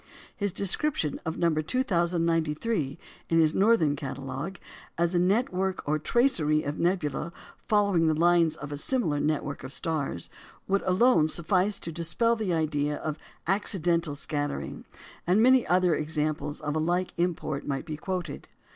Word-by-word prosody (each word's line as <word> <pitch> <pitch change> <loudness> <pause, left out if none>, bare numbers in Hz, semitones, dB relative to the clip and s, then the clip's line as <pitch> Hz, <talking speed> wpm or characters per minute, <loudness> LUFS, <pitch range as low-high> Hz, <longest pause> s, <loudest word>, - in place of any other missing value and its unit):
His 200 -2 -1
description 200 - 0
of 160 - -2
No. 170 -2 +2
2,093 165 - 0 0.3
in 165 - +3
his 155 -1 +4
northern 195 -8 +3
catalogue 135 +4 -5 0.4
as 170 +1 +1
"a 175 - +3
network 190 - 0
or 155 +1 +1
tracery 155 - +2
of 145 +2 -4
nebula 170 -3 0 0.4
following 200 -6 +3
the 155 - +2
lines 170 -1 +3
of 145 -1 -8
a 145 - -3
similar 165 - 0
network 145 -2 -2
of 130 - -7
stars," 145 - -3 0.4
would 195 0 +2
alone 185 -3 +4
suffice 185 +5 +1
to 165 - -3
dispel 170 +8 +1
the 215 -5 -2
idea 150 -3 0
of 155 -1 -4 0.3
accidental 175 -5 0
scattering; 145 0 -4 0.4
and 185 +4 +4
many 255 +2 +5
other 180 -1 +3
examples 150 -1 -2
of 150 0 -2
a - - +1
like 175 +3 0
import 170 -4 -2
might 135 -2 -2
be 155 -2 -5
quoted. 175 -1 -5
165 Hz, 145 wpm, -27 LUFS, 150-190 Hz, 0.4 s, many